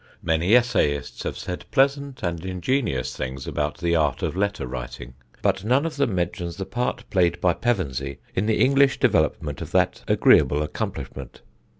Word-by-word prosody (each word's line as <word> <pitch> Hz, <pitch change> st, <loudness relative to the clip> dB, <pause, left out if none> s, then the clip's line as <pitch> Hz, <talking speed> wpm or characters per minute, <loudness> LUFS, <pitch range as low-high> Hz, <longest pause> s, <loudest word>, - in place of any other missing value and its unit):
Many 85 Hz, +6 st, +3 dB
essayists 75 Hz, -, +1 dB
have -, -, -4 dB
said 90 Hz, -, -6 dB
pleasant 140 Hz, 0 st, +1 dB
and 85 Hz, -2 st, -2 dB
ingenious 90 Hz, -, -1 dB
things 65 Hz, 0 st, -5 dB
about 75 Hz, 0 st, -2 dB
the 85 Hz, 0 st, 0 dB
art 75 Hz, -5 st, +1 dB
of -, -, -1 dB
letter 100 Hz, -6 st, -1 dB
writing; -, -, -7 dB, 0.3 s
but 95 Hz, -, +1 dB
none 130 Hz, +7 st, +2 dB
of 160 Hz, -2 st, -4 dB
them 135 Hz, -8 st, +1 dB
mentions 85 Hz, -1 st, -2 dB
the 95 Hz, -, -4 dB
part 125 Hz, +4 st, -3 dB
played 85 Hz, -2 st, +2 dB
by 90 Hz, -1 st, +3 dB
Pevensey 70 Hz, -, -2 dB, 0.2 s
in 100 Hz, +3 st, 0 dB
the 110 Hz, -, +1 dB
English 135 Hz, +1 st, +4 dB
development 80 Hz, -, +1 dB
of -, -, -5 dB
that -, -, +1 dB
agreeable 75 Hz, +1 st, +4 dB
accomplishment. 70 Hz, -3 st, -6 dB
90 Hz, 165 wpm, -24 LUFS, 75-120 Hz, 0.3 s, English